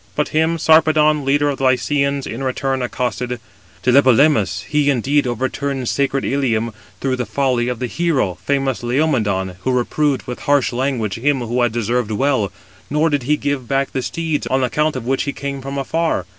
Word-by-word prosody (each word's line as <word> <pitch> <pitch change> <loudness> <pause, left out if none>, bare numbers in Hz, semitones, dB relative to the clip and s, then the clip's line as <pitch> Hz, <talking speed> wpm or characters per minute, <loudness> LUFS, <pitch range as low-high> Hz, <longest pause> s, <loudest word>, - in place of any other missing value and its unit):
But 150 - 0
him 160 +2 +1
Sarpedon, 155 -2 +4
leader 145 +2 +2
of 135 - -6
the - - -3
Lycians, 140 +2 +1
in 115 - -5
return 135 0 -1
accosted: 125 0 -2 0.4
"Tlepolemus, 125 -6 +4
he 150 -1 +1
indeed 140 +2 +1
overturned 130 +2 -2
sacred 140 -1 0
Ilium, 115 -5 0 0.3
through 130 -1 -1
the 125 - -2
folly 125 0 0
of 125 -1 -2
the 125 - -3
hero, 130 - -1
famous 135 -4 0
Laomedon, 115 - 0
who 130 - -1
reproved 135 +3 0
with 125 - -6
harsh 145 -3 +1
language 120 -5 -1
him 135 +1 +1
who 120 +1 -1
had 120 -2 +2
deserved 120 0 -1
well, 110 -2 0 0.4
nor 150 +2 +1
did 145 -2 +1
he 150 - +4
give 140 -5 -2
back 135 +1 0
the 130 - -2
steeds, 160 +2 -2
on 130 0 +1
account 150 +4 0
of 125 -3 -5
which 135 +2 0
he 140 - -2
came 140 -1 -5
from 135 +1 -5
afar. 160 - -1
135 Hz, 180 wpm, -19 LUFS, 120-145 Hz, 0.4 s, Sarpedon